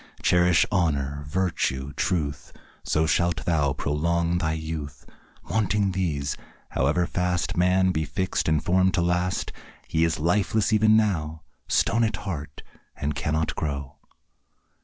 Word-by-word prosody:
Cherish 90 -1 +4
honour, 70 -6 0
virtue, 75 -5 -1
truth, 75 -6 -2 0.3
So 80 +1 +1
shalt 85 +2 +1
thou 75 -5 +1
prolong 85 +5 0
thy 80 -2 0
youth. 80 -2 -6 0.4
Wanting 105 -2 +1
these, 75 -7 -1 0.3
however 75 +7 +1
fast 90 -1 -1
Man 90 +1 +3
be 80 -3 -1
fix'd 80 +4 -1
and 80 -2 +1
form'd 95 +1 +3
to 90 - +2
last, 90 +1 0 0.4
He 80 - +1
is 80 -1 +1
lifeless 100 +6 +1
even 110 0 +5
now, 80 -7 0 0.2
Stone 115 0 +2
at 110 -2 0
heart, 75 -8 -6 0.3
and 75 +1 -2
cannot 80 +2 -1
grow. 70 -3 -4
85 Hz, 130 wpm, -25 LUFS, 75-90 Hz, 0.4 s, even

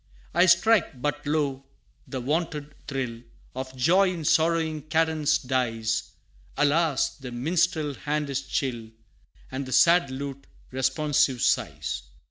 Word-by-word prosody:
I 175 +3 +5
strike 175 - +4
but 145 +2 -3
lo, 145 -3 0 0.4
the 130 - -4
wonted 150 +2 -2
thrill, 125 -5 -4 0.3
Of 130 0 -6
joy 185 +9 +4
in 165 -4 -5
sorrowing 160 0 +2
cadence 160 -1 +2
dies: 115 -4 -1 0.4
Alas! 145 0 +2
the 130 -3 -8
minstrel's 155 +3 0
hand 150 0 -2
is 135 0 -1
chill, 125 -4 -3 0.6
And 130 0 -4
the - - -7
sad 170 +2 +5
lute, 140 +1 -6 0.2
responsive, 130 0 +1
sighs. - - 0
145 Hz, 120 wpm, -26 LUFS, 130-160 Hz, 0.6 s, I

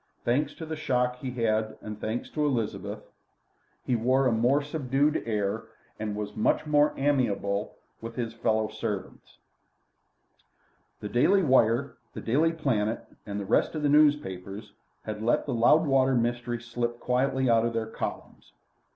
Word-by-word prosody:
Thanks 130 +6 +1
to 160 - -7
the 160 0 -4
shock 125 -4 0
he 130 +1 -5
had 125 -2 -2
had 110 0 0
and 105 -1 -8
thanks 110 +3 -3
to 150 - -1
Elizabeth, 125 -7 -2 0.8
he 125 - +1
wore 130 +4 +2
a 125 - +3
more 120 +5 +3
subdued 145 0 0
air, 105 0 -1 0.3
and 105 -1 -3
was 105 0 -5
much 110 - +1
more 150 0 +3
amiable 110 -7 0 0.3
with 115 0 -7
his 120 -3 -3
fellow 110 -1 0
servants. 105 -3 -6 1.6
The 105 - -5
Daily 185 - +3
Wire, 130 -2 +3 0.2
the - - -5
Daily 150 +8 +2
Planet, 120 -9 -1 0.2
and 100 0 -3
the 100 - -4
rest 110 - +1
of 155 - -3
the 145 - +3
newspapers 105 -9 +1 0.3
had 105 -1 -5
let 115 +2 +1
the - - -2
Loudwater 135 +1 +4
mystery 120 0 -1
slip 120 0 -3
quietly 130 +1 +1
out 115 -1 +4
of 115 0 -1
their 115 -1 -1
columns. 110 - -7
120 Hz, 155 wpm, -27 LUFS, 110-135 Hz, 1.6 s, Loudwater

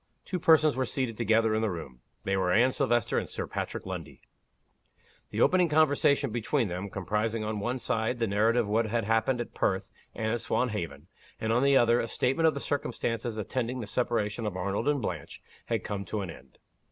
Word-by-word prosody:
Two 180 - -3
persons 155 -2 +5
were 130 - 0
seated 125 -4 -2
together 115 0 +2
in 110 - +1
the 110 - +1
room: 75 -9 -7 0.2
they 95 - 0
were 95 -2 +1
Anne 120 +7 +4
Silvester 120 -5 +1
and - - -6
Sir - - -3
Patrick - - -4
Lundie. - - -7 1.1
The - - -2
opening 180 -2 +4
conversation 145 -3 +3
between 120 +1 0
them 90 +3 -4
comprising, 105 +4 -1
on 105 0 -2
one 120 +5 -1
side, 115 0 -1
the 115 - +1
narrative 110 +3 +2
of 100 - -5
what 110 +1 +2
had 115 +1 0
happened 115 +4 +1
at 120 - -5
Perth 95 -1 -1 0.2
and 110 0 -1
at 120 - -2
Swanhaven; 90 - -2 0.3
and, 110 0 0
on 120 - +3
the 140 0 +5
other, 120 0 +4
a - - -1
statement 135 +8 +1
of 155 - +2
the - - -2
circumstances 115 -5 -2
attending 125 +3 -2
the 115 - -4
separation 110 0 -1
of 95 -3 -4
Arnold 100 +7 -2
and 145 -4 +1
Blanche 85 -7 -5 0.3
had - - -1
come 100 -1 -3
to 105 +3 -3
an 95 -4 -5
end. 65 -4 -15
115 Hz, 200 wpm, -29 LUFS, 105-125 Hz, 1.1 s, persons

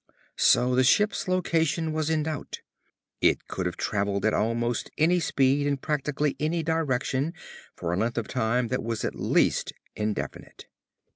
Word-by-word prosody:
So 125 +1 +4
the 130 +1 +4
ship's 210 +13 +2
location 165 -3 +1
was 155 0 -1
in 155 -1 +1
doubt. 155 -2 -5 0.6
It - - +2
could 90 -1 -3
have 90 - -5
travelled 100 0 -1
at 110 - +3
almost 120 +1 0
any 175 +3 +3
speed 140 -2 +2
in 140 -1 +1
practically 150 0 -1
any 160 +2 0
direction 150 -1 -1 0.4
for 85 0 -3
a - - 0
length 115 +4 -1
of 115 - -1
time 125 -1 0
that 125 - -1
was 115 -2 -3
at - - -2
least - - +1 0.2
indefinite. 105 -1 -4
135 Hz, 155 wpm, -26 LUFS, 115-155 Hz, 0.6 s, So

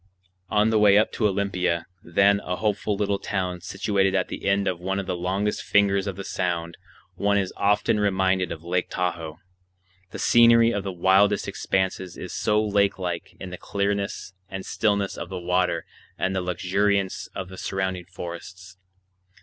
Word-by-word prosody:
On 105 +1 +3
the 110 - +3
way 105 -1 +6
up 110 - +3
to 110 - +1
Olympia, 90 -4 0 0.2
then 100 +4 +3
a 90 -2 -3
hopeful 105 0 -1
little 100 0 0
town 90 -3 -3
situated 95 +1 0
at 95 - 0
the - - -5
end 100 0 +2
of 90 - -1
one 95 +2 -2
of 100 - -3
the 90 - -2
longest 95 +4 -1
fingers 100 -1 +2
of 100 - -3
the 100 - -6
Sound, 85 -3 -2 0.4
one 100 0 +1
is 95 -2 -1
often 105 +1 +2
reminded 95 -3 +1
of 85 -1 -6
Lake 90 +1 -1
Tahoe, 85 -3 -3 0.7
the - - -8
scenery 115 0 +6
of 100 -3 -2
the 100 - -3
widest 95 +3 +3
expanses 95 -1 -2
is 90 - -7
so 105 0 +1
lake 100 -1 +2
like 90 -3 -4
in 95 -2 -7
the 90 - -7
clearness 100 -1 -2 0.2
and 95 -1 -6
stillness 100 -2 0
of 85 - -6
the 95 - -5
water 90 -2 0 0.3
and 95 0 -1
the 95 - 0
luxuriance 95 +2 0
of 95 -1 -5
the 95 - -10
surrounding 95 -2 -2
forests. 90 +1 -9
95 Hz, 175 wpm, -25 LUFS, 90-100 Hz, 0.7 s, way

